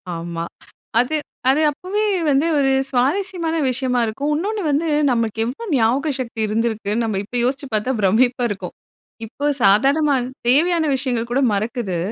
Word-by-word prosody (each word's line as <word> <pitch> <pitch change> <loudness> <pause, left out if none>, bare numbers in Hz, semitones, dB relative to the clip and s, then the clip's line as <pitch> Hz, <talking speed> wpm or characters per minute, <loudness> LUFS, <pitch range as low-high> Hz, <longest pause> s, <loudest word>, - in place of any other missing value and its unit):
ஆமா. 165 0 -5 0.5
அது 250 +6 +1 0.3
அது 280 +4 +3
அப்பவே 390 +8 -2 0.2
வந்து 280 +2 +3
ஒரு 270 -1 +2 0.2
சுவாரஸ்யமான 325 +6 0
விஷயமா 255 0 0
இருக்கும். 275 +7 -2
இன்னொன்னு 405 +8 -2
வந்து 300 +4 0 0.2
நமக்கு 225 -2 -1
எவ்ளோ 260 - -5
ஞாபக 255 +5 +2
சக்தி 235 -3 -5
இருந்திருக்கு, 220 -1 -1
நம்ம 215 -4 -1
இப்ப 245 +4 -5
யோசிச்சி 270 +3 -1
பார்த்தா 215 +5 0
பிரமிப்பா 245 +5 +2
இருக்கும். 205 -2 -6 0.5
இப்ப 285 +6 -3
சாதாரணமா 275 +9 +4 0.3
தேவையான 325 +6 +3
விஷயங்கள் 245 -3 -2
கூட 265 +3 +1
மறக்குது. 210 -2 -2
255 Hz, 140 wpm, -20 LUFS, 225-290 Hz, 0.5 s, சாதாரணமா